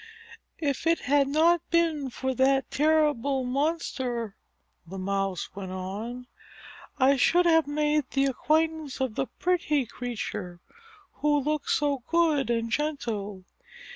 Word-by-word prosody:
"If 285 0 -2
it 335 0 +2
had 280 +1 +2
not 325 +4 +3
been 325 -5 +1
for 260 +1 -3
that 270 +1 +2
terrible 290 -3 +2
monster," 255 -5 -2 0.5
the 190 +3 -8
Mouse 195 -1 -2
went 190 -2 -6
on, 205 +7 -5 0.7
"I 270 0 +4
should 350 +7 +4
have 325 -3 +4
made 300 0 +1
the 275 0 +1
acquaintance 310 +2 0
of 260 -4 -1
the 265 - -2
pretty 335 -6 0
creature, 210 -7 -5 0.6
who 295 0 +2
looked 300 +1 -2
so 290 -2 +1
good 320 -6 +2
and 230 -1 -1
gentle. 225 -10 -3
275 Hz, 125 wpm, -27 LUFS, 235-305 Hz, 0.7 s, I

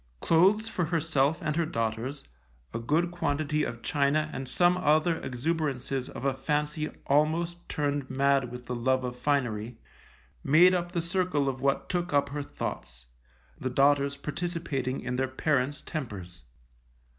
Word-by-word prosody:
Clothes 195 - +4
for 180 -6 -1
herself 155 -2 +1
and 150 -1 -1
her 170 0 +1
daughters, 115 +4 -2 0.5
a - - -2
good 160 +9 +1
quantity 150 -2 0
of 115 -3 -5
china 150 +2 +1
and 130 -1 -5
some 175 +7 +4
other 160 -1 +3
exuberances 135 -1 -2
of 125 - -7
a 135 - +2
fancy 150 +3 -1 0.2
almost 160 +4 +1
turned 145 -2 -1
mad 135 -1 +2
with 125 0 -8
the 125 - -4
love 130 +2 +1
of 125 -1 -3
finery, 125 -4 -1 0.7
made 170 +6 +6
up 175 -1 -1
the 170 - 0
circle 170 -4 0
of 130 -1 -2
what 140 0 +1
took 175 -2 -2
up 140 0 +3
her 145 +1 -3
thoughts, 60 - -6 0.5
the - - -2
daughters 140 +2 +3
participating 150 -5 -3
in 125 0 -3
their 130 0 +1
parents' 140 +1 0
tempers. 95 - -6
145 Hz, 150 wpm, -28 LUFS, 130-160 Hz, 0.7 s, made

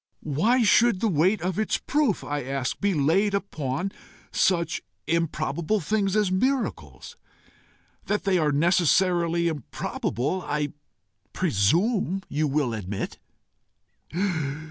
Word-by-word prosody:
"Why 215 - +2
should 225 0 +4
the 225 - +1
weight 185 +2 +2
of 185 +2 -1
its 215 - +1
proof, 285 -9 0
I 145 -1 -3
ask, 135 0 -3
be 200 -2 +1
laid 185 +8 +2
upon 180 -3 -3 0.4
such 170 -3 +1 0.2
improbable 165 +3 0
things 200 +2 0
as 210 -3 +2
miracles? 185 - -2 0.9
That 210 +1 0
they 190 -2 +2
are 150 -2 +2
necessarily 170 +2 +2
improbable, 150 +1 -3
I 150 -3 -2 0.6
presume 185 - +1
you 155 +1 0
will 140 -4 0
admit." 100 -2 -5
170 Hz, 110 wpm, -25 LUFS, 145-200 Hz, 0.9 s, should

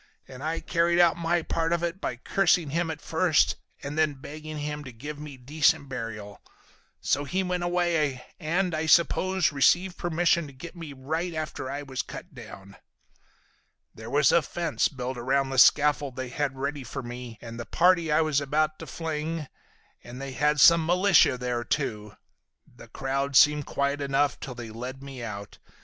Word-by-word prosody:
And 130 0 -11
I 160 +1 -2
carried 170 0 +1
out 170 -2 +5
my 170 0 0
part 165 0 -1
of 170 0 0
it 170 +2 -3
by - - -2
cursing 170 +3 +1
him 170 +2 0
at 160 -1 -4
first 165 -1 +2 0.3
and 145 +3 -4
then 155 -2 +2
begging 155 +3 -8
him 150 0 -4
to 130 - -9
give 145 +6 -8
me 150 -3 -9
decent 140 +1 +1
burial. 105 -5 -6 0.6
So 145 - +1
he 185 +7 -1
went 180 -1 -2
away, 170 -7 0
and, 175 +3 0
I 160 +1 -1
suppose, 185 +2 +3
received 175 +6 +2
permission 170 -1 +1
to 140 - -12
get 170 +7 -10
me 165 -4 -8
right 160 +6 -3
after 155 -4 -4
I 145 +2 -4
was 130 -2 -3
cut 180 - -10
down. 105 -5 -12 1.2
"There 110 +1 -10
was 145 -2 +4
a 170 - +5
fence 170 +2 -1
built 130 -2 -5
around 135 +2 0
the 135 - +1
scaffold 145 -1 +4
they 130 0 -5
had 135 +1 -2
ready 140 +1 -3
for 135 +2 -6
me 120 -1 -8
and 115 0 -9
the 120 - -5
party 170 -2 +3
I 150 - +4
was 155 -3 +1
about 155 +2 0
to - - -8
fling, 160 -1 -4 0.6
and 125 +1 -9
they 135 0 -6
had 150 +4 +1
some 165 +5 +7
militia 180 -4 +4
there, 125 -1 -2
too. 105 -6 -3 0.5
The - - -16
crowd 135 +1 -2
seemed 150 0 +5
quiet 140 +1 -1
enough 140 -1 +1
till 125 - -7
they 120 -2 -8
led 125 +4 -7
me 135 -2 -8
out. 100 -3 -7
145 Hz, 180 wpm, -27 LUFS, 130-165 Hz, 1.2 s, some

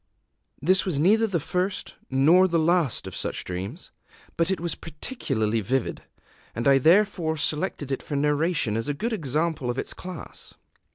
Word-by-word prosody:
This 180 +4 +4
was 175 -6 -1
neither 215 +8 +4
the 185 -5 0
first 180 +5 -2 0.2
nor 160 +8 +5
the 170 -2 +1
last 165 -4 +1
of - - -7
such - - -3
dreams; 95 - -6 0.4
but 165 +1 +1
it 190 - 0
was 170 -1 -2
particularly 115 - -2
vivid, 130 +5 -1 0.5
and 115 +3 -1
I 135 -1 +6
therefore 170 0 +3
selected 150 -1 0
it 135 - -1
for 145 - -5
narration 150 -4 +1
as 115 0 -1
a 145 - -1
good 230 +10 -2
example 155 - -1
of 120 - -2
its - - -3
class. 180 -3 -9
160 Hz, 165 wpm, -25 LUFS, 135-180 Hz, 0.5 s, I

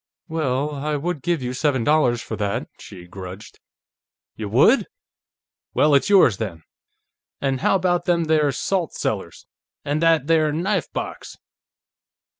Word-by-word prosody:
"Well... 150 -3 -1
I 150 +1 -2
would 155 +1 -3
give 170 -3 -1
you 125 0 -3
seven 130 -2 0
dollars 125 -4 +2
for - - -5
that," 100 -2 -2
she 90 -2 -11
grudged. 95 +3 -10 0.8
"Y'would? 115 - +3 0.9
Well, 150 0 +4
it's 140 +7 +3
yours, 185 - +5
then. 90 -8 -5 0.8
An' 135 -1 -1
how - - +2
about 175 -2 +1
them 170 -1 +2
there 155 -2 +2
salt 180 +3 -2
cellars, 95 -6 -4 0.4
an' 145 +2 0
that 165 -4 +3
there 155 -1 +3
knife 175 +2 -1
box?" - - -6
145 Hz, 135 wpm, -22 LUFS, 120-165 Hz, 0.9 s, yours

